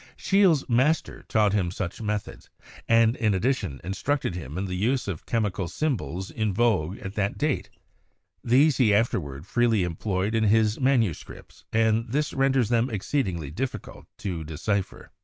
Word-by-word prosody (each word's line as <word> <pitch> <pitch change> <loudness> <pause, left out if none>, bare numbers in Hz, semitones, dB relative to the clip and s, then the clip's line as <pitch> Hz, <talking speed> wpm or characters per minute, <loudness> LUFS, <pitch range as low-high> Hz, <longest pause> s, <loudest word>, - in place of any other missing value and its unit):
Scheele's 190 -7 +3
master 130 +7 +1
taught 105 -3 +2
him 95 -4 +1
such 90 +2 -5
methods, 105 -1 -4 0.4
and 115 0 +4
in 110 -4 +1
addition 95 - -1
instructed 100 - -1
him 80 -3 -6
in 95 - -2
the 95 - -4
use 115 +8 0
of 90 -6 -3
the - - -33
chemical 105 -5 -1
symbols 95 - -3
in 110 -2 -1
vogue 100 -5 +1
at 95 - -7
that 100 -1 -1
date; 150 -2 -1 0.7
these 135 +5 +4
he 110 -6 +4
afterward 75 - -1
freely 115 -2 +2
employed 95 +4 -2
in 110 -1 +2
his 110 0 +3
manuscripts, 125 - -1
and 110 +1 +2
this 150 +3 0
renders 135 -4 +2
them 120 +1 +2
exceedingly 95 - -2
difficult 125 +10 -5
to 85 -5 -4
decipher. 95 +6 -3
110 Hz, 155 wpm, -26 LUFS, 95-125 Hz, 0.7 s, and